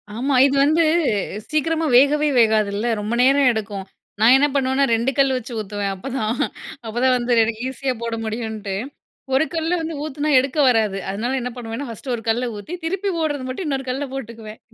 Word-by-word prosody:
ஆமா, 265 +4 0
இது 280 0 +1
வந்து 315 +3 +3 0.7
சீக்கிரமா 320 +1 0
வேகவே 295 +3 +4
வேகாதுல்ல, 215 -1 +2
ரொம்ப 210 +3 -3
நேரம் 275 0 +5
எடுக்கும். 200 -3 -5 0.3
நான் 230 +4 +7
என்ன 290 +2 +3
பண்ணுவேன்னா, 270 0 +2
2 230 +3 0
கல் 275 -1 +4
வச்சு 250 0 -8
ஊத்துவேன். 205 -1 -3
அப்பதான் 225 +2 -3 0.5
அப்பதான் 245 +4 +2
வந்து 240 0 0 0.3
ஈஸியா 265 0 -2
போட 230 -1 -2
முடியும்ன்ட்டு, 220 -3 -4 0.6
ஒரு 270 +4 +3
கல்ல 330 +1 -1
வந்து 320 0 -4
ஊத்தினா 300 0 -3
எடுக்க 275 +3 -2
வராது. 220 -5 +1
அதனால 235 +7 -2
என்ன 250 - -3
பண்ணுவேன்னா, 245 +3 -6
1 240 +3 -5
ஒரு 230 - -7
கல்ல 240 +3 +1
ஊத்தி 205 - -8
திருப்பி 385 +4 -1
போடுறது 295 -4 -1
மட்டும் 265 +8 -4
இன்னொரு 270 -2 -2
கல்ல 270 +3 -2
போட்டுக்குவேன். 225 -4 -8
255 Hz, 165 wpm, -21 LUFS, 220-280 Hz, 0.7 s, நான்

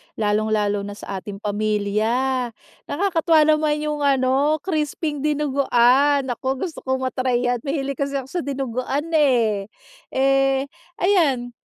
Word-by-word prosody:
lalong-lalo 210 -1 0
na 205 0 -7
sa 195 -2 -6
ating 200 +1 -9
pamilya. 215 +5 0 0.4
Nakakatuwa 330 -1 +2
naman 305 0 +2
yung 300 -1 -2
ano, 275 +1 +2
crisping 305 -3 -2
dinuguan. 280 -1 +3
Naku, 260 +1 -3
gusto 325 - -9
kong 260 0 -1
ma-try 255 -1 0
yan, 245 - -1
mahilig 275 -2 -2
kasi 280 0 -2
ako 265 - -5
sa 360 - -2
dinuguan 275 +2 -3
eh. 235 -9 +2 0.4
Eh 270 0 +2 0.3
ayan, 290 -11 +2
265 Hz, 125 wpm, -22 LUFS, 235-295 Hz, 0.4 s, dinuguan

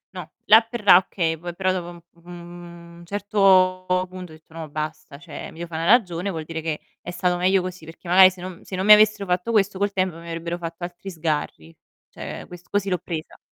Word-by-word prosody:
no; - - -8
là 220 +2 +8
per 230 0 -8
là, 185 - +9
okay, 170 -3 -1
poi 175 +2 -7
però 185 +1 0
dopo 175 -2 -4
un 175 -1 -12 0.2
u 175 -1 -12
un 170 - -14
certo 190 -2 +3 0.3
punto 185 -2 -9
ho - - -12
detto: 155 0 -22
"No 160 -1 -7
basta, 155 -1 -6
cioè 170 0 -9
mi - - -16
devo 170 - -5
fa' 165 - -9
'na 165 - -2
ragione, 190 -4 +2
vuol 160 -4 -5
dire 160 0 -5
che 155 -1 -3 0.2
è 175 - -7
stato 180 0 0
meglio 185 +2 +2
così", 180 -2 -7
perché 165 +2 -13
magari 185 +2 +8
se 185 - -15
non 185 +1 -9
se 190 - -7
non 190 - -2
mi 210 - +10
avessero 215 -1 +4
fatto 180 +5 -1
questo 205 -3 +1
col 200 +1 0
tempo 185 -3 -1
mi 170 0 -12
avrebbero 170 +1 -4
fatto 170 0 -7
altri 175 +2 -9
sgarri. 150 - -4 0.3
Cioè - - -8
quest 175 -1 -13
così 200 -1 -1
l'ho 180 -2 0
presa. 160 -2 -7
175 Hz, 230 wpm, -23 LUFS, 165-190 Hz, 0.3 s, mi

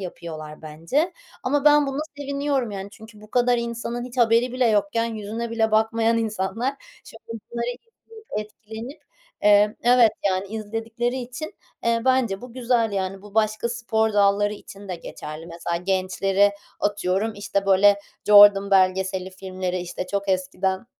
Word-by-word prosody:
yapıyorlar 160 -4 -8
bence. 165 - -1 0.3
Ama 280 +2 0
ben 295 -1 +6
buna 275 +1 -2 0.2
seviniyorum, 280 -3 -1
yani, 195 -1 -6
çünkü 220 0 -14
bu 215 0 -15
kadar 245 0 +3
insanın 235 +1 -4
hiç 250 +1 -9
haberi 235 +1 +3
bile 255 -1 +2
yokken 215 +1 +1
yüzüne 220 +2 -5
bile 225 -1 +1
bakmayan 225 +1 +2
insanlar, 225 +4 -2 0.3
şimdi - - -14 0.3
bunları 235 0 -3 0.4
izleyip 445 -1 -15
etkilenip, 220 +5 -9 0.4
emm 210 +1 +5
Evet 240 -2 +6 0.2
yani, 190 0 0
izledikleri 225 +3 -3
için, 255 +6 -7 0.3
eee, 230 0 +1
bence 255 -7 +2
bu 250 -1 -10
güzel 235 -3 +1
yani. 195 0 -3
Bu 210 0 -14
başka 215 +1 +1
spor 225 -2 0
dalları 205 0 +3
için 200 -1 -12
de 180 - -3
geçerli. 155 0 -8
Mesela, 170 0 -4
gençleri, 190 +2 +1 0.3
atıyorum, 205 +1 0
işte, 200 -1 -2
böyle, 200 +1 +5 0.3
“Jordan” 205 -1 +8
belgeseli 190 0 +2
filmleri, 185 -1 -4
işte, 180 +1 -5
çok 200 +1 -3
eskiden 190 +2 -1
215 Hz, 145 wpm, -23 LUFS, 195-235 Hz, 0.4 s, Jordan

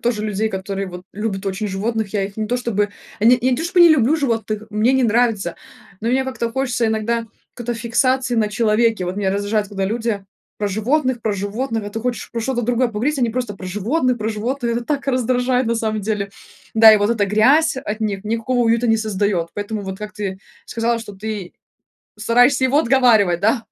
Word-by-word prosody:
тоже 235 -3 0
людей, 215 +1 -1
которые 195 0 -4
вот 180 0 -8
любят 200 -2 -4
очень 195 +2 -2
животных. 215 +2 -2
Я 200 -2 0
их 200 +1 -8
не 215 -1 -2
то 245 +3 0
чтобы 210 -4 -1 0.3
не 240 +3 +5
я 250 0 +2
то 325 - -3
чтобы 355 +1 +2
не 345 - +9
люблю 295 +1 +4
животных, 225 -6 -2
мне 215 +4 +2
они 265 -1 +2
нравятся. 225 -6 +1 0.4
Но 230 - -2
мне 265 +2 +2
как-то 255 -3 -3
хочется 250 -3 0
иногда 230 +1 -1 0.3
какой-то 240 -1 -4
фиксации 255 +2 +1
на 215 -2 +2
человеке. 220 -2 +1
Вот 180 +2 -4
меня 195 -2 0
раздражает, 205 +1 -1
когда 195 -2 -3
люди 220 -1 -2 0.3
про 205 -1 -1
животных, 250 +4 0
про 215 - 0
животных, 215 +3 -3
а 205 - -6
ты 225 - -4
хочешь 245 +1 -3
про 230 - -3
что-то 240 0 -1
другое 245 +2 +1
поговорить, 250 +7 -1
они 240 -3 +1
просто 240 -4 -3
про 185 - -9
животных, 240 - 0
про 215 +1 -2
животных, 235 +3 -2
это 240 - -3
так 280 0 -2
раздражает 250 0 +1
на 235 - +1
самом 220 -1 -1
деле. 200 -1 -2 0.4
Да 220 0 +9
и - - +6
вот 205 +2 +1
эта 215 -4 +1
грязь 260 +11 +4
от 220 -5 -4
них 205 -2 -2
никакого 230 +3 -1
уюта 230 +1 +2
не 225 -1 +4
создаёт, 200 -5 -1
поэтому 205 0 -4
вот, 190 0 -6
как 210 0 -7
ты 200 -3 -4 0.3
сказала, 230 0 -1
что 210 -2 -9
ты 205 -2 -6 0.7
стараешься 245 +5 +3
его 270 +3 +3
отговаривать, 230 - +4
да, 225 +3 +1
225 Hz, 205 wpm, -20 LUFS, 205-245 Hz, 0.7 s, не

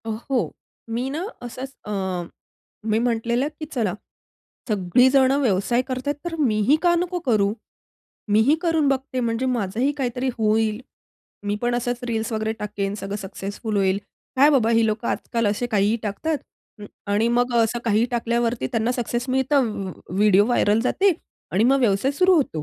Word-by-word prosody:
अ, - - -4
हो. 235 +3 -2 0.4
मी 240 +3 -2
ना 310 +5 -3 0.2
असंच 255 +3 -7
अ, 210 - -5 1.0
मी 220 - +3
म्हटलेलं, 235 +2 0
की 310 - -4
"चला 220 -8 0 0.8
सगळीजण 250 +7 +4
व्यवसाय 235 +1 +2
करत 255 +1 -4
आहेत, 290 - +1
तर 345 -1 -3
मी 225 -8 +2
ही 295 - +7
का 350 -1 +5
नको 355 +1 -1
करू? 205 -4 +3 0.8
मी 210 +1 +4
ही 295 - +5
करून 325 -4 +2
बघते. 265 -1 -1
म्हणजे 235 +1 -1
माझंही 240 +1 0
काहीतरी 255 -1 -1
होईल. 220 0 +1 0.7
मी 205 0 0
पण 240 0 +1
असंच 245 0 -1
रील्स 225 0 -2
वगैरे 220 0 -1
टाकेन. 200 -1 -3
सगळं 195 0 -5
सक्सेसफुल 200 +2 -5
होईल. 190 -1 +2 0.4
काय 285 +3 +6
बाबा 245 -6 +3
ही 230 -1 +4
लोकं 215 +2 -2
आजकाल 230 -2 -1
असे 205 +4 0
काहीही 210 -1 +2
टाकतात 285 +9 -2 0.4
अ, - - -7 0.3
आणि 215 +3 +2
मग 245 +1 +1
असं 230 +1 +2
काहीही 225 0 +3
टाकल्यावरती 235 0 0
त्यांना 230 +1 +1
सक्सेस 245 +1 -2
मिळतं. 265 0 +2 0.2
व 185 - -5 0.3
व्हिडिओ 205 -1 +5
व्हायरल 225 -3 +2
जाते 385 +9 +3 0.4
आणि 200 +5 +3
मग 270 +2 +4
व्यवसाय 220 +2 +2
सुरू 365 +6 +4
होतो 210 - 0
235 Hz, 165 wpm, -23 LUFS, 215-260 Hz, 1.0 s, ही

